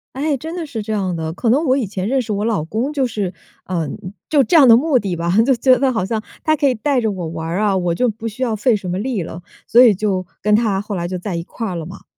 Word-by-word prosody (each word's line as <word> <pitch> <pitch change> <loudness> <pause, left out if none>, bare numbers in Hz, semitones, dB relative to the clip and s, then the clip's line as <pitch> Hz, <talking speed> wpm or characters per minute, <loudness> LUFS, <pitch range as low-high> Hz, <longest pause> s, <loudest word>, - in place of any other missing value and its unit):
哎， 285 0 0
真 320 +6 -7
的 345 - -3
是 225 -6 -5
这 220 0 -3
样 190 -4 -1
的。 160 0 -4
可 225 +5 -1
能 290 +7 +3
我 260 0 +3
以 245 -7 -1
前 190 0 -4
认 265 +1 +1
识 220 - -5
我 205 +1 -1
老 215 -9 0
公 230 - -2
就 270 -3 +1
是 200 -5 -3 0.3
呃， 170 -5 -2 0.4
就 290 -3 +4
这 290 - 0
样 280 -5 +8
的 230 0 +8
目 280 -2 +2
的 190 -3 -3
吧， 170 +1 -1
就 265 0 +3
觉 255 +1 +4
得 270 -1 +1
好 190 -6 -1
像 220 +1 -2 0.2
他 310 0 +3
可 285 -2 +2
以 250 - 0
带 255 +3 0
着 220 -2 0
我 180 -3 -5
玩 160 0 -5
儿 175 +4 -2
啊， 205 -2 +2
我 175 -2 0
就 250 - +1
不 225 +1 -5
需 225 +4 -4
要 225 -3 0
费 230 +2 +2
什 195 -3 -5
么 180 +2 -2
力 225 -6 -2
了， 165 +2 -8 0.2
所 240 - +5
以 225 -6 +7
就 190 -2 -1 0.2
跟 210 +1 +3
他 215 -4 +1
后 205 +1 -5
来 175 -1 -2
就 185 0 -4
在 180 0 -4
一 170 - -2
块 225 +4 -6
儿 180 - -4
了 165 - -4
嘛。 180 - -11
215 Hz, 320 characters per minute, -19 LUFS, 185-255 Hz, 0.4 s, 样